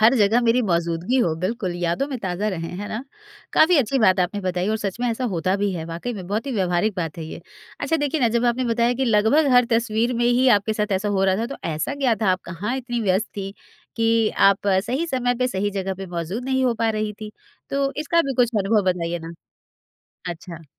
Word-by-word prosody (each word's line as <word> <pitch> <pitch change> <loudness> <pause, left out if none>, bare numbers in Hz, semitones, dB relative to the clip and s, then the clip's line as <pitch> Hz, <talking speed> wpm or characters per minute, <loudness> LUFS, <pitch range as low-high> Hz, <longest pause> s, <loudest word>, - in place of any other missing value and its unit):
हर 225 +4 +6
जगह 220 +2 +4
मेरी 235 +1 +3
मौजूदगी 170 +3 0
हो, 170 -10 +2
बिल्कुल। 185 +1 -2
यादों 175 +11 0
में 265 -3 -4
ताज़ा 190 0 -2
रहें, 165 -4 -4
है 205 - -5
ना? 230 +5 -5 0.5
काफ़ी 340 +2 +5
अच्छी 270 +1 +1
बात 185 -5 +4
आपने 185 +3 -1
बताई 185 0 -1
और 220 - +1
सच 205 -1 -4
में 245 - +1
ऐसा 240 +3 -3
होता 185 +3 0
भी 200 0 0
है 165 -3 -4
वाक़ई 170 +9 -5
में 190 -4 -7
बहुत 215 +8 -2
ही 270 - -2
व्यावहारिक 190 0 0
बात 165 -2 -4
है 160 - -5
ये। 160 - -8 0.4
अच्छा 325 - +1
देखिए 290 0 -1
ना 235 - +4
जब 235 +1 0
आपने 240 +2 +1
बताया 235 0 +2
कि 265 +2 0
लगभग 230 +7 +3
हर 245 0 +6
तस्वीर 230 +1 +1
में 235 0 0
ही 245 +2 +4
आपके 210 +2 -3
साथ 210 -2 -1
ऐसा 190 +2 0
हो 195 -1 +1
रहा 190 -1 +3
था 225 +3 -1
तो 275 - -7 0.2
ऐसा 155 - -2
क्या 270 -5 +2
था? 200 - +3
आप 185 - -2
कहाँ 200 +9 -3
इतनी 240 -2 -3
व्यस्त 200 +1 +1
थी, 195 -1 -4 0.4
कि 225 -1 +3
आप 195 +1 +4
सही 230 - +1
समय 250 -4 0
पे 255 - +2
सही 205 -2 -1
जगह 195 -1 -3
पे 190 0 -7
मौजूद 175 +7 -4
नहीं 260 0 +1
हो 245 -2 +2
पा 225 0 0
रही 215 -1 -2
थी? 215 - -6 0.4
तो 275 0 0
इसका 310 +3 +2
भी 275 -3 -3
कुछ 245 -2 +3
अनुभव 205 +2 +2
बताइए 175 -1 -2
ना। 165 0 -8 1.0
अच्छा। 170 -1 -10
215 Hz, 235 wpm, -22 LUFS, 185-245 Hz, 1.0 s, हर